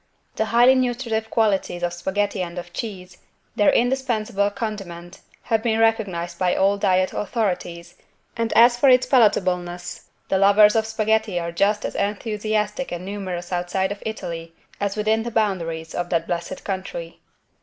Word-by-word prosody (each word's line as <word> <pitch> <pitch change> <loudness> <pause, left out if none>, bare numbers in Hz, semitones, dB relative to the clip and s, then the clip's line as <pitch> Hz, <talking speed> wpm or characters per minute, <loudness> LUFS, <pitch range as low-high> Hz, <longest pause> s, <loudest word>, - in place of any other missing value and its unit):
The 220 - 0
highly 240 +3 +5
nutritive 240 -3 -1
qualities 195 -5 0
of 175 0 -1
spaghetti 195 +3 -2
and 175 0 -5
of 175 0 -7
cheese, 185 -5 -7 0.4
their 205 - +4
indispensable 235 -5 0
condiment, 195 -5 -6 0.2
have 225 -1 0
been 225 -1 0
recognized 210 -7 0
by 180 -1 +2
all 195 +1 +3
diet 185 -1 +2
authorities 180 -6 -3 0.4
and, 230 -1 -1
as 240 +1 +6
for 265 +3 +4
its 255 0 +5
palatableness, 180 -8 +1 0.2
the 190 - +1
lovers 210 +2 +6
of 220 0 +1
spaghetti 220 -3 0
are 170 0 -4
just 205 +5 +1
as - - -3
enthusiastic 210 +3 -2
and 175 +1 -5
numerous 190 -3 -5
outside 180 +2 -1
of 200 - -6
Italy 170 -6 -6 0.2
as 200 -1 -1
within 215 +1 +1
the 235 - -4
boundaries 170 -8 -2
of 175 0 -3
that 165 -1 0
blessed 175 +1 -4
country. 185 -4 -5
200 Hz, 155 wpm, -22 LUFS, 175-220 Hz, 0.4 s, as